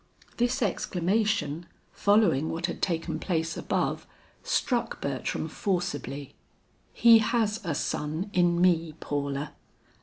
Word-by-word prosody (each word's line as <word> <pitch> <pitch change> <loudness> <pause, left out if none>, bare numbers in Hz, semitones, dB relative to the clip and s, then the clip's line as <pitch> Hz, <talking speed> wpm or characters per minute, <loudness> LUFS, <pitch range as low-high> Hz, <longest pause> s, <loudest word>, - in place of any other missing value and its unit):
This 245 +2 +1
exclamation 180 -4 0 0.2
following 200 -8 +3
what 165 +1 -2
had 175 - -4
taken 165 -3 -1
place 165 -2 -1
above - - -1 0.3
struck 240 -3 0
Bertram 140 +3 -2
forcibly. 145 - -3 0.6
"He 230 -1 +7
has 220 -1 +1
a 165 -5 -2
son 155 +8 -2
in 175 -1 +3
me, 170 -3 +2
Paula. 140 0 -3
175 Hz, 110 wpm, -28 LUFS, 150-210 Hz, 0.6 s, He